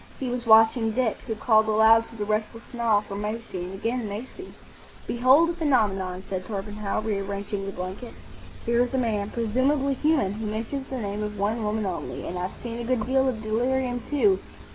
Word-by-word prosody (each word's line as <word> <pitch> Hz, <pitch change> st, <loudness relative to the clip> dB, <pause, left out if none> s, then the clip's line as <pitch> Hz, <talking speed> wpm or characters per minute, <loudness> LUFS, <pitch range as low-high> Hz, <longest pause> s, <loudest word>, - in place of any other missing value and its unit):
He 260 Hz, -, -2 dB
was 245 Hz, -1 st, -4 dB
watching 225 Hz, 0 st, +6 dB
Dick, 240 Hz, -2 st, +1 dB
who 225 Hz, -, -2 dB
called 220 Hz, 0 st, +3 dB
aloud 220 Hz, +1 st, +5 dB
to 230 Hz, -, -14 dB
the 210 Hz, -2 st, -3 dB
restless 215 Hz, +2 st, -2 dB
Nile 230 Hz, -4 st, +2 dB
for 205 Hz, -, -9 dB
Maisie,—and 205 Hz, -3 st, -4 dB
again 230 Hz, +2 st, -2 dB
Maisie! 260 Hz, -, -7 dB, 0.5 s
"Behold 265 Hz, +8 st, +4 dB
a -, -, -4 dB
phenomenon," 200 Hz, -, 0 dB
said 185 Hz, -2 st, -3 dB
Torpenhow, 210 Hz, 0 st, -3 dB
rearranging 200 Hz, -1 st, -3 dB
the -, -, -3 dB
blanket. 190 Hz, +6 st, -6 dB, 0.5 s
"Here 235 Hz, +1 st, +3 dB
is 250 Hz, +2 st, -3 dB
a -, -, +2 dB
man, 215 Hz, -5 st, 0 dB
presumably 260 Hz, +5 st, +1 dB
human, 275 Hz, -8 st, +1 dB
who 215 Hz, +1 st, -4 dB
mentions 230 Hz, +6 st, -4 dB
the 265 Hz, -, -4 dB
name 205 Hz, -2 st, -3 dB
of 210 Hz, 0 st, -4 dB
one 215 Hz, +3 st, 0 dB
woman 210 Hz, 0 st, -1 dB
only. 185 Hz, -2 st, -4 dB
And 180 Hz, -, -4 dB
I've 180 Hz, +1 st, -4 dB
seen 235 Hz, -1 st, -5 dB
a -, -, -3 dB
good 235 Hz, -2 st, 0 dB
deal 265 Hz, +2 st, +2 dB
of 225 Hz, -3 st, -4 dB
delirium, 245 Hz, +3 st, 0 dB
too. 210 Hz, -10 st, +3 dB
220 Hz, 185 wpm, -26 LUFS, 205-245 Hz, 0.5 s, watching